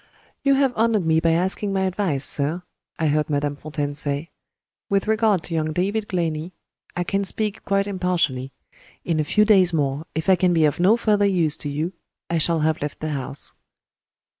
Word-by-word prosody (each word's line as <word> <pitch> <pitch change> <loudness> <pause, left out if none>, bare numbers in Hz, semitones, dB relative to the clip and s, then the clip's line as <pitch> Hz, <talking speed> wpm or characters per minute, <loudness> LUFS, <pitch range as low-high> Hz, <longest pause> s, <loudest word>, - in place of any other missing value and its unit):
"You 275 -1 +3
have 270 -2 +2
honored 220 -4 +1
me 160 0 +3
by 165 0 +2
asking 190 +4 +1
my 190 - 0
advice, 185 -7 0
sir," 155 +5 +1 0.3
I 160 - -1
heard 150 +1 +1
Madame 145 0 -1
Fontaine 145 -1 -4
say. 145 +2 -2 0.6
"With 200 +1 +1
regard 220 -5 +2
to 170 - -5
young 155 -1 -1
David 205 +5 -1
Glenney, 165 -1 -2 0.4
I 175 - -1
can 195 +3 -1
speak 210 +1 -1
quite 195 0 +1
impartially. 175 -9 -1 0.5
In 165 -2 0
a - - +2
few 210 +8 +2
days 190 -5 +5
more, 145 +1 -1
if 160 +3 -3
I 190 - +6
can 180 0 +2
be 160 -1 +4
of 150 - 0
no 195 +6 +4
further 210 -3 +2
use 170 -6 +1
to 145 - -5
you, 155 +6 -3 0.4
I 170 - +1
shall 165 +1 +1
have 155 0 0
left 145 0 -4
the 155 - -3
house." 140 -1 -5
170 Hz, 190 wpm, -22 LUFS, 150-195 Hz, 0.6 s, I